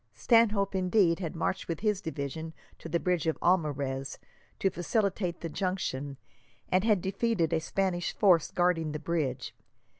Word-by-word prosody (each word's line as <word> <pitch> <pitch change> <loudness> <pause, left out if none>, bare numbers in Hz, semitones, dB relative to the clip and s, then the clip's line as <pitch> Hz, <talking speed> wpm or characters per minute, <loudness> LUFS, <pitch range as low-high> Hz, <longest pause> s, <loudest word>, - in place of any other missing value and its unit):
Stanhope, 205 - +3
indeed 185 -2 +2
had 170 -4 -4
marched 170 +3 -2
with 165 -2 -4
his 210 -2 +1
division 160 -1 -5 0.3
to 165 - -8
the 170 - +1
bridge 180 -3 0
of 160 - +1
Almarez 140 -6 0 0.4
to 195 - +1
facilitate 180 0 -1
the 170 - -3
junction, 150 -6 -3 0.5
and 185 +1 +2
had 210 -4 +3
defeated 190 -4 0
a 160 - +3
Spanish 175 +1 -1
force 180 -6 +4
guarding 170 -4 +1
the - - -2
bridge. 145 -6 -2
175 Hz, 150 wpm, -29 LUFS, 160-195 Hz, 0.5 s, force